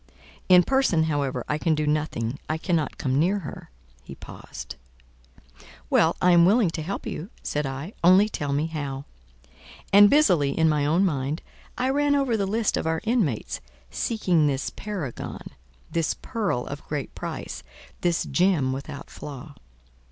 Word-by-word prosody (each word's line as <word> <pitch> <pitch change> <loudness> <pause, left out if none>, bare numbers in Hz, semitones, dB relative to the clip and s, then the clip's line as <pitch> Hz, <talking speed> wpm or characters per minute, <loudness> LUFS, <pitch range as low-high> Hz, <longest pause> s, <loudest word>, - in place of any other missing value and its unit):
In 180 -1 +8
person, 265 -11 +2
however, 145 -4 -1
I 150 - -1
can 160 -1 +2
do 155 0 -1
nothing 150 -5 -1
I 155 - 0
cannot 165 -2 -1
come 130 -2 0
near 185 +6 +2
her"—he - - -11
paused. - - -9 1.2
"Well, 165 +1 +4
I 180 - +4
am 170 -1 +6
willing 200 0 +4
to 160 - -4
help 185 +6 -4
you," 170 +6 -5
said 150 -1 -1
I, 140 +9 -6
"only 185 +4 +6
tell 145 -9 -3
me 145 +2 +1
how." 145 -4 -5 0.9
And 205 +1 +9
busily, 180 - +3
in 160 - +4
my 150 -2 +2
own 170 +6 +3
mind, 145 -2 -2 0.3
I 255 +2 +1
ran 290 +1 +2
over 270 -5 +1
the 200 -3 0
list 220 +2 0
of - - -2
our 160 0 0
inmates, 215 - -1 0.3
seeking 180 -9 +1
this 135 -1 -1
paragon, 185 - -6 0.4
this 165 -2 0
pearl 190 - -2
of 140 +1 -7
great 150 -2 -4
price, - - -6 0.4
this 175 -1 +1
gem 175 -8 +2
without 140 +2 -7
flaw. 145 +1 -9
160 Hz, 155 wpm, -25 LUFS, 145-195 Hz, 1.2 s, And